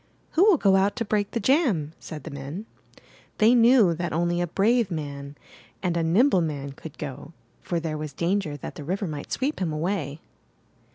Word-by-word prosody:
*'Who 340 - +4
will 410 -6 +6
go 195 -6 +4
out 195 +1 +2
to 235 -2 -2
break 205 -1 0
the 235 - -2
jam?'' 215 - +2
said 155 -2 -8
the 160 - -7
men. 140 +9 -6 0.7
They 220 +3 +5
knew 235 -6 +6
that 170 0 -3
only 175 +2 +1
a 175 - 0
brave 220 +5 +2
man 140 -4 -5 0.5
and 175 -2 0
a 170 - +1
nimble 185 - +4
man 145 -4 -3
could 145 +2 -11
go, 145 +2 -7 0.3
for 170 - -2
there 155 -2 -3
was 155 -1 -5
danger 170 0 -1
that - - -7
the 150 - -8
river 190 +7 -2
might 150 -4 -6
sweep 280 +4 -1
him 170 -4 0
away. 155 -2 -2
175 Hz, 190 wpm, -25 LUFS, 150-205 Hz, 0.7 s, will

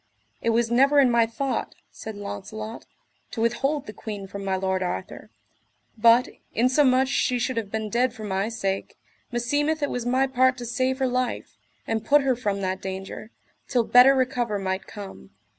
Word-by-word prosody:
It 230 - 0
was 230 0 +1
never 275 +4 +5
in 260 -3 +5
my 235 -1 +4
thought, 265 +4 -3 0.2
said 220 -1 -8
Launcelot, 215 - -7 0.4
to - - -7
withhold 265 +6 0
the 210 - -8
queen 210 -3 -7
from 200 +1 -7
my 190 -1 0
lord 190 0 -1
Arthur; 180 - -5 0.7
but, 230 +2 +5 0.3
insomuch 255 +2 +3
she 255 -1 +1
should 250 +1 -1
have 225 -3 -3
been 220 +1 -3
dead 240 +3 +1
for 225 -2 -10
my 195 +1 -1
sake, 195 -4 -3 0.3
meseemeth 290 +6 0
it 285 - 0
was 245 - -2
my 260 +2 +3
part 260 0 +2
to 245 - -6
save 255 +2 0
her 265 -1 +1
life, 250 -1 -2 0.3
and 220 -1 -2
put 285 +5 +4
her 265 -2 +2
from 205 -5 -2
that 190 0 -2
danger, 190 +3 -6 0.4
till 245 -3 +2
better 250 +4 +7
recover 245 -5 0
might 190 -1 -3
come. 195 - -10
235 Hz, 175 wpm, -25 LUFS, 205-255 Hz, 0.7 s, better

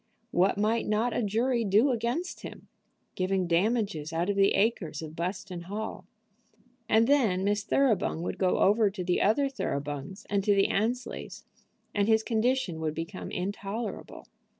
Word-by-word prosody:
What 185 +3 +2
might 220 +3 +1
not 220 +3 +1
a - - +1
jury 235 +3 +1
do 215 +7 +4
against 245 +9 -2
him, - - -10 0.4
giving 185 0 0
damages 180 -3 0
out 170 +4 0
of - - -3
the 195 0 +4
acres 200 -7 0
of 155 0 -8
Buston 180 +1 -4
Hall? 215 +4 -5 0.8
And 220 +1 +5
then 230 -9 +3
Miss 205 +1 +1
Thoroughbung 215 -10 +1
would - - -4
go 185 -1 +2
over 210 +1 +4
to 195 -2 -5
the 180 0 +1
other 235 +8 +3
Thoroughbungs 145 - -4
and 200 -1 0
to 205 0 +3
the 195 - +3
Annesleys, 235 +5 -2 0.5
and 205 0 +1
his 220 0 +4
condition 225 -6 0
would 155 -1 -2
become 165 +4 -5
intolerable. 200 +4 -5
205 Hz, 155 wpm, -28 LUFS, 180-225 Hz, 0.8 s, And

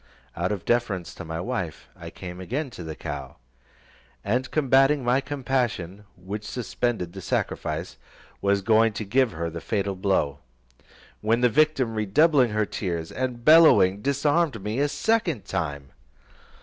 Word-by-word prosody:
Out 85 +3 -1
of 100 -4 -4
deference 100 -8 0
to - - -9
my 80 0 -5
wife, 90 - -4
I - - -9
came 90 0 -9
again 130 - -3
to 90 - -8
the 80 -1 -6
cow, 70 -3 -6 0.9
and 125 +6 -1
combating 135 -1 +3
my 125 +3 +2
compassion, 125 -9 -2
which 100 +4 -6
suspended 115 -5 -3
the 95 - -8
sacrifice, - - -3 0.4
was 100 0 +1
going 110 +1 +4
to 105 +1 -4
give 125 +3 +2
her 85 +1 -3
the 85 0 -6
fatal 100 0 -1
blow, 95 -7 0 0.8
when 115 +3 +1
the 125 - +5
victim 135 -3 +2
redoubling 125 +6 +3
her 105 0 0
tears, 85 -6 -4
and 125 -2 -4
bellowing, 150 - +6
disarmed 140 - +1
me 105 +5 -2
a 145 - +3
second 170 - 0
time. 70 -4 -4
110 Hz, 150 wpm, -25 LUFS, 90-130 Hz, 0.9 s, bellowing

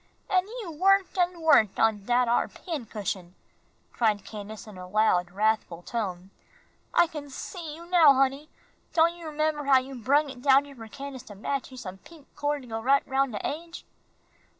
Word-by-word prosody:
"An' 370 0 +3 0.2
you 345 - -7
worked 385 +4 +3
an' 355 -1 +1
worked 285 -11 +4
on 215 -3 +2
dat 245 0 +3
ar 235 - +2
pincushion," 210 - -5 0.6
cried 210 -4 +1
Candace, 210 0 -8
in 215 -2 -11
a 180 0 -9
loud, 180 -3 +2
wrathful 200 -3 0
tone. 190 -5 -4 0.6
"I 345 - +5
can 300 -3 -8
see 315 +3 -7
you 335 +1 -11
now, 340 -4 +6
honey. 275 +3 +1 0.4
Don' 335 0 +4
you 335 -2 -8
'member 305 -1 -1
how 275 -1 +6
you 260 +1 -3
brung 275 +4 +1
it 250 -2 -12
down 275 +1 +5
here 285 - -12
for 225 -3 -10
Candace 275 +1 -8
to 205 - -10
match 270 +7 -3
you 260 - -12
some 190 -6 -8
pink 320 +2 -16
cord 290 -1 -1
to - - -13
go 225 -1 -4
right 275 +4 +3
round 270 -2 +1
de 205 - -3
aidge?" 335 +3 -7
270 Hz, 185 wpm, -27 LUFS, 215-310 Hz, 0.6 s, now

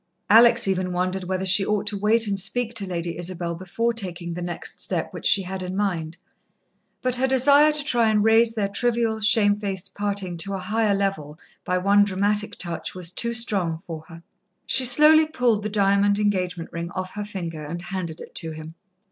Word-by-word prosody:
Alex 235 0 +6
even 185 -1 -1
wondered 185 +1 -2
whether 185 +1 -3
she 190 +2 +5
ought 210 0 -1
to 210 - -1
wait 215 +3 +1
and 200 -2 -2
speak 230 +5 -1
to 205 -4 -2
Lady 170 -2 -5
Isabel 175 -1 -4
before 185 +7 -2
taking 175 -6 -4
the 175 - -6
next 175 0 -4
step - - +1
which - - -1
she 195 - +6
had 190 +1 -6
in 185 +1 -5
mind, 175 -5 -2 0.9
but 255 -1 +2
her 265 +1 +1
desire 280 +3 +4
to 300 -1 0
try 240 -6 +2
and 210 -1 +2
raise 225 +1 +3
their 205 -3 -1
trivial, 230 +1 0
shamefaced 205 -3 +1
parting 200 -4 -3
to 195 +4 -3
a - - -3
higher 210 +2 0
level 195 -7 -3 0.3
by 180 - -1
one 200 +2 +3
dramatic 205 +2 -1
touch, 170 -1 -4
was 180 -2 -3
too 235 +4 -2
strong 195 -8 0
for 160 -1 -9
her. 165 -1 -13 0.4
She 260 - +1
slowly 305 +5 +6
pulled 245 -8 0
the 210 - -4
diamond 200 0 +2
engagement 185 -5 -2
ring 170 0 -5
off 185 0 -4
her 210 - -5
finger, 170 -6 -6
and 165 +4 -6
handed 180 -4 -6
it - - -12
to 165 - -2
him. 155 +1 -10
195 Hz, 195 wpm, -23 LUFS, 180-220 Hz, 0.9 s, Alex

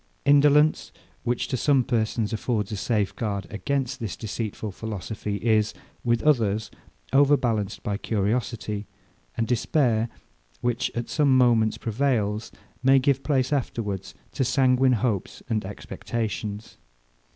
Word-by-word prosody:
Indolence, 145 - +4 0.3
which, 120 0 -1
to - - 0
some 135 0 +3
persons, 110 -2 0
affords 110 -1 -1
a - - -2
safeguard 100 -1 -1
against 135 +4 -2
this 110 -6 -4
deceitful 110 -1 -4
philosophy, 105 0 -5
is, 110 -1 +1 0.3
with 120 -1 +1
others, 110 -8 +2 0.4
overbalanced 125 -8 +2
by 100 -1 -1
curiosity; 105 0 -2 0.5
and 115 - +1
despair, 120 -1 +1 0.5
which, 120 -1 0
at 120 0 -2
some 140 -4 +3
moments, 115 -3 +4
prevails, 110 -3 -1 0.3
may 135 +1 +5
give 135 0 +2
place 135 -2 +1
afterwards 105 -8 -3 0.2
to 135 - -1
sanguine 130 0 +3
hopes 110 -4 -1
and 110 -2 0
expectations. 105 +1 -5
115 Hz, 120 wpm, -25 LUFS, 105-130 Hz, 0.5 s, may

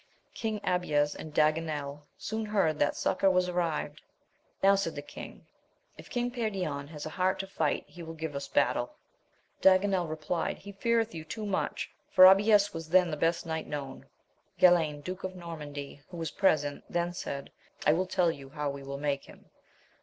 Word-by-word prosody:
King 220 -2 -2
Abies 150 -5 +1
and 155 - -8
Daganel 150 -2 0
soon 220 0 -3
heard 190 -8 +1
that 145 - +2
succour 195 - +2
was 180 -1 +3
arrived. 165 -4 -2 0.6
Now, 195 +1 +7
said 195 -4 0
the 145 - -5
king, - - -10 0.5
if - - -13
King 245 0 -1
Perion 190 - -2
has 150 -1 -8
a 155 - -5
heart 185 +2 +1
to 195 - -3
fight 175 -6 -1
he 175 - -12
will 165 0 -7
give 160 -1 -4
us 140 - -4
battle. - - +1 0.7
Daganel 190 -2 +4
re 155 - -2
plied, 160 +2 -2
he 200 - -10
feareth 225 +3 +1
you 160 -1 -6
too 215 +7 -6
much, 200 -2 -2 0.2
for 185 - +8
Abies 205 +2 +6
was 165 -1 -6
then 180 -1 +4
the - - -1
best 165 +3 0
knight 160 -1 -3
known. 140 -3 -6 0.5
Galayn, 160 -5 +4
Duke 185 +3 -6
of 185 0 -4
Normandy, 150 -5 -7
who 175 - -8
was 165 -1 -3
present, 145 -7 +1
then 175 0 -1
said, 140 -5 -5 0.3
I 150 - +6
will 185 +3 0
tell 180 -2 +2
you 135 -3 -10
how 150 -1 -2
Ave 140 - -8
will 140 0 -6
make 140 -1 -1
him. - - -17
165 Hz, 185 wpm, -30 LUFS, 150-190 Hz, 0.7 s, for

